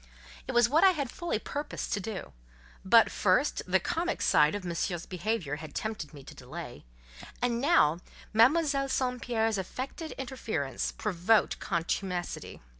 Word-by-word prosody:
It 260 - -3
was 240 -1 +5
what 305 +8 +3
I 380 -1 +7
had 275 -4 -2
fully 345 -8 -2
purposed 290 +6 -4
to 205 - 0
do; 195 - -6 0.5
but, - - +6
first, - - +2
the - - +3
comic - - -2
side 150 +5 +4
of 205 -3 -5
Monsieur's 175 0 -2
behaviour 180 -5 -2
had 155 0 -10
tempted 215 -8 -4
me 145 -3 -12
to - - -11
delay, - - -9 0.5
and 240 -1 0
now, 220 - +4 0.3
Mademoiselle 275 +4 +4
St. 250 -2 -1
Pierre's 225 -3 0
affected 265 - -5
interference 220 - -3
provoked 210 +2 +1
contumacity. 175 +1 -3
220 Hz, 145 wpm, -29 LUFS, 175-260 Hz, 0.5 s, I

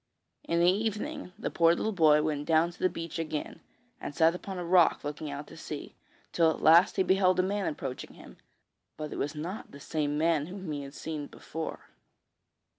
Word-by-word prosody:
In 170 - +1
the 175 +1 +6
evening, 220 +5 -3
the - - -3
poor 165 0 +4
little 220 - -1
boy 155 -5 +5
went 150 -2 -2
down 165 +1 +3
to 175 - -18
the 185 - +3
beach 165 -1 -6
again, 155 -2 -4 0.4
and 145 - -6
sat 165 0 +5
upon 190 +1 -6
a 175 - -4
rock 175 0 +4
looking 150 +1 -5
out 145 +1 -6
to 165 - -13
sea, 150 -2 -7 0.4
till 165 -2 +4
at 160 - -2
last 165 +4 +7
he 190 - +3
beheld 185 -1 +3
a - - +4
man 200 +1 -1
approaching 135 -4 -5
him, - - -14 0.6
but 155 -1 -5
it - - -5
was 145 +2 -2
not 175 +8 -5
the 140 - -12
same 150 0 -2
man 160 -1 +2
whom 185 -2 -6
he 145 -1 -3
had 140 0 -9
seen 155 -3 -5
before. 160 0 -7
165 Hz, 200 wpm, -29 LUFS, 150-185 Hz, 0.6 s, last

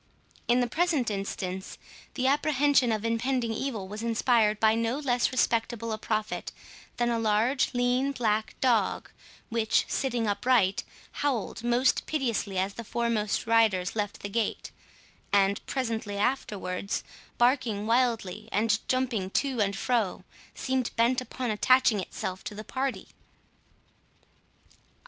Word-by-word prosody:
In 245 +1 +4
the 245 - +1
present 310 -5 +1
instance, 190 -1 -4 0.4
the 260 - -1
apprehension 285 -2 +3
of 215 0 -1
impending 230 0 0
evil 220 -5 -3
was 210 +3 -6
inspired 225 -2 +2
by 220 0 +4
no 230 +3 0
less 250 -4 +1
respectable 230 -2 0
a 215 - -3
prophet 215 -1 -2 0.5
than 240 0 +1
a 230 - 0
large 225 +5 +2
lean 250 +3 +2
black 220 -5 -1
dog, 230 -7 +1 0.4
which, 225 -2 +1
sitting 245 -4 -1
upright, 210 -1 +2 0.3
howled 250 -5 -2
most 240 +2 +2
piteously 230 -9 -1
as 190 +2 0
the 230 - -7
foremost 230 -2 -1
riders 220 -5 +2
left 205 -2 -3
the - - -2
gate, 225 +1 -2 0.6
and 200 0 +3
presently 225 -6 -2
afterwards, 200 -5 -2 0.3
barking 240 -4 +2
wildly, 225 -3 0
and 220 +1 +2
jumping 250 -7 0
to 260 +2 0
and 200 -1 +1
fro, 225 -3 0 0.3
seemed 260 -2 -1
bent 240 +2 +2
upon 250 -1 -4
attaching 240 0 +4
itself 185 0 -5
to 210 - -5
the 215 - -7
party. 265 +3 -3
230 Hz, 130 wpm, -28 LUFS, 210-255 Hz, 0.6 s, In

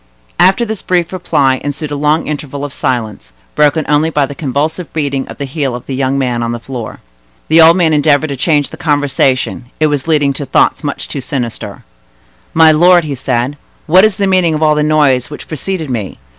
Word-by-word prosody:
After 195 +6 +4
this 220 -2 -5
brief 175 -1 -1
reply 140 -7 0
ensued 145 +1 -4
a - - -2
long 150 +3 +1
interval 145 -1 -5
of 140 - -8
silence, 115 - -3 0.2
broken 150 +1 +2
only 150 +2 +2
by 150 -3 +1
the 140 - -8
convulsive 150 +4 -3
beating 140 -4 -2
of - - -10
the 140 - -4
heel 135 -2 -3
of 125 - -8
the 135 - -5
young 135 +1 -1
man 125 -3 -1
on 120 0 -2
the 120 - -5
floor. 120 -2 -7 0.5
The 160 +1 +6
old 165 +2 +7
man 165 -3 +2
endeavored 150 0 +2
to 140 - -3
change 145 +1 0
the - - -9
conversation; 140 -4 0
it 155 - +3
was 145 +1 -3
leading 145 -3 +2
to 140 - -5
thoughts - - +2
much 145 - -4
too 140 - -5
sinister. 125 -3 -5 0.7
"My 160 -1 +7
lord," 175 +2 +4
said 125 0 -1
he, - - -20 0.3
"what 185 +5 +5
is 215 -2 +3
the 200 - 0
meaning 185 -4 +2
of 155 - -1
all 155 -1 +4
the 150 - 0
noise 145 -4 +2
which 150 - -9
preceded 160 -1 -4
me? 110 -6 -4
145 Hz, 210 wpm, -13 LUFS, 135-160 Hz, 0.7 s, old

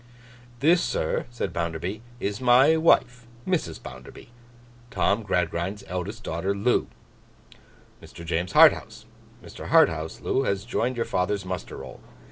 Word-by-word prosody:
'This, 170 +4 +4
sir,' - - -2
said 120 - -4
Bounderby, 85 +5 -3 0.2
'is 100 +3 -3
my 130 +5 +5
wife, 125 -7 +2 0.2
Mrs. 160 - -1
Bounderby: - - -11 0.6
Tom 110 -4 +1
Gradgrind's 90 0 -2
eldest 95 +5 -5
daughter. 95 +5 -2
Loo, 110 +5 +1 1.1
Mr. 85 - -11
James 85 +1 -2
Harthouse. - - +4 0.4
Mr. - - -10
Harthouse 80 0 +3 0.3
has 100 -5 -2
joined 125 +1 -1
your 115 - 0
father's 95 +2 -1
muster 90 -2 -5
roll. - - -10
100 Hz, 120 wpm, -25 LUFS, 90-120 Hz, 1.1 s, my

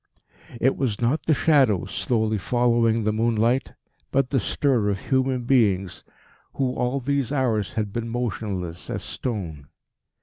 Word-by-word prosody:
It 130 +4 +3
was 120 -7 -1
not 120 +7 0
the 160 - +5
shadows 135 - +3
slowly 110 -3 0
following 115 0 +2
the 105 0 +1
moonlight, 115 +3 +1 0.4
but 135 -1 +1
the 135 - +2
stir 120 -1 +1
of 100 -1 -1
human 130 0 0
beings 100 -8 +1 0.5
who 130 -2 0
all 125 +2 -1
these 140 -1 -1
hours 120 -8 0
had 105 -3 -2
been 115 0 -3
motionless 100 -7 -4
as - - -3
stone. 85 - -5
115 Hz, 140 wpm, -24 LUFS, 105-130 Hz, 0.5 s, the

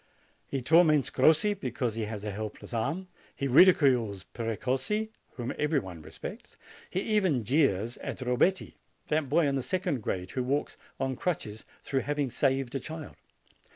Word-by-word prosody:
He 135 -2 -3
torments 155 -1 +5
Crossi 160 +10 +4
because 125 - -2
he 110 0 -2
has 105 -1 -6
a 105 - -3
helpless 110 +3 -6
arm. 140 +12 -1 0.3
He 140 - -2
ridicules 125 - +5
Precossi, 130 - -1 0.2
whom 120 0 -4
every 150 0 +2
one 90 - -4
respects. - - -9 0.3
He 185 - -1
even 190 - +1
jeers 120 -3 +1
at - - -5
Robetti, 130 +9 +1 0.3
that 150 -3 +1
boy 160 +3 +4
in 140 - +1
the 135 - 0
second 140 -2 -1
grade, 90 -2 -3
who 130 - -1
walks 140 +4 -1 0.2
on 135 -1 -1
crutches, 115 -10 -3 0.2
through 135 - 0
having 145 0 -1
saved 135 0 +1
a 135 - -1
child. 155 +2 -8
135 Hz, 155 wpm, -29 LUFS, 115-155 Hz, 0.3 s, torments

